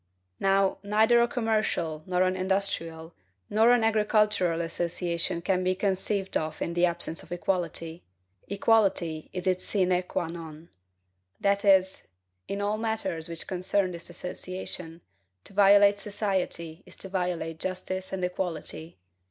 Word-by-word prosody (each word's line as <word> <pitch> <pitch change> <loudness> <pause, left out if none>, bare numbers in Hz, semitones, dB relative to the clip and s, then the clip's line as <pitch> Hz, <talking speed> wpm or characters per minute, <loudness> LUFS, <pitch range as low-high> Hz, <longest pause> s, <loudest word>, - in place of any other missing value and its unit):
Now, 195 0 +2
neither 220 +4 +4
a 235 - +4
commercial, 215 -10 -1
nor 180 0 +2
an 185 0 +1
industrial, 185 -4 -1 0.4
nor 220 +2 +5
an 245 -2 +5
agricultural 210 -5 +2
association 170 0 -1
can 185 0 +1
be 185 0 +1
conceived 195 0 -1
of 155 0 -1
in 170 - -2
the 175 +1 +3
absence 170 -1 -3
of - - -16
equality; 175 -2 -2 0.5
equality 195 -6 +1
is 180 -1 -5
its 185 -1 +1
sine 185 -3 +2
qua 185 - -1
non. 165 -1 -9 0.7
So - - -33
that, 200 -1 +3 0.5
in 200 0 -3
all 210 +1 0
matters 220 -7 -2
which 165 -1 -5
concern 185 +1 0
this 170 0 -8
association, 180 -1 -5 0.4
to - - -12
violate 200 0 +6
society 190 -5 -3
is - - -13
to - - -8
violate 180 -4 -2
justice 185 +1 -4
and 185 -1 -1
equality. 170 -3 -4
185 Hz, 135 wpm, -28 LUFS, 170-200 Hz, 0.7 s, violate